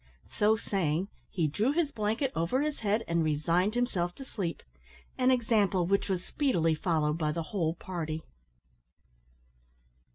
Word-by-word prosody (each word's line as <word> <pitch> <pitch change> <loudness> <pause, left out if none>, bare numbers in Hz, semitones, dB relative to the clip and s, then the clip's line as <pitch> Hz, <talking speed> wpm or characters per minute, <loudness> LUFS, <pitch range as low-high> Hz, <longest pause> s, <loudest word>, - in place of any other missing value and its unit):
So 210 +1 +3
saying, 190 -3 -1 0.2
he 165 -5 0
drew 215 - +1
his 320 -3 +1
blanket 225 +5 0
over 175 - +1
his 300 -1 -2
head 215 +1 +1
and 170 0 +1
resigned 170 +7 +1
himself 185 -8 0
to 270 - -9
sleep, 185 -9 -4 0.5
an 255 0 +3
example 220 -7 +3
which 200 +3 +1
was 185 -2 -1
speedily 175 - +1
followed 155 -1 0
by 155 -2 +1
the 165 +1 -2
whole 165 -5 0
party. 160 -3 -4
190 Hz, 140 wpm, -30 LUFS, 165-225 Hz, 0.5 s, So